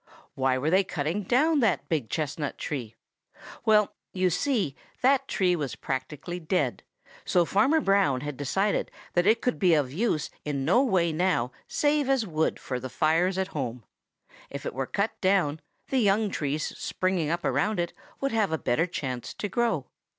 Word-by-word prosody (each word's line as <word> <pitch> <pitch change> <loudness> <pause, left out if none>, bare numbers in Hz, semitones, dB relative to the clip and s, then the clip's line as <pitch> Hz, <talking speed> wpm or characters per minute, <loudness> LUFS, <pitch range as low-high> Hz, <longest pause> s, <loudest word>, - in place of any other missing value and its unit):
Why 130 -1 +1
were 145 +5 0
they 190 +2 +5
cutting 175 +1 -2
down 290 - +3
that 220 -8 +1
big 145 -9 -1
chestnut 150 0 -3
tree? 120 -7 -4 0.7
Well, 210 -2 +4 0.2
you 185 -1 +2
see 200 - 0 0.3
that 270 +1 +4
tree 180 -3 +2
was 145 -6 -3
practically 145 +6 -4
dead, 175 +2 0 0.4
so 175 -2 +3
Farmer 275 - +3
Brown 195 - +2
had 150 -1 -4
decided 190 +10 0 0.2
that 175 +2 +2
it 225 +2 +4
could 250 - 0
be 180 -4 +5
of 140 -4 0
use 180 -4 0
in 140 -2 -2
no 190 - +5
way 180 -10 +2
now 155 -8 +1 0.2
save 290 -2 +1
as 265 -4 +2
wood 160 -4 0
for 125 -2 -4
the 130 +1 -6
fires 165 +7 +2
at 190 0 -1
home. 125 -7 -4 0.7
If 140 0 -7
it - - -3
were 130 0 -2
cut 200 +2 0
down, 185 -6 +2 0.3
the 265 - +2
young 205 -1 +2
trees 150 -1 -2
springing 185 -4 -1
up 170 +1 -1
around 210 -1 +1
it 175 0 -1 0.3
would 275 - 0
have 215 -5 +1
a 160 - +1
better 160 +5 +1
chance 130 -8 -4
to 205 - -3
grow. 230 - 0
175 Hz, 175 wpm, -27 LUFS, 145-205 Hz, 0.7 s, they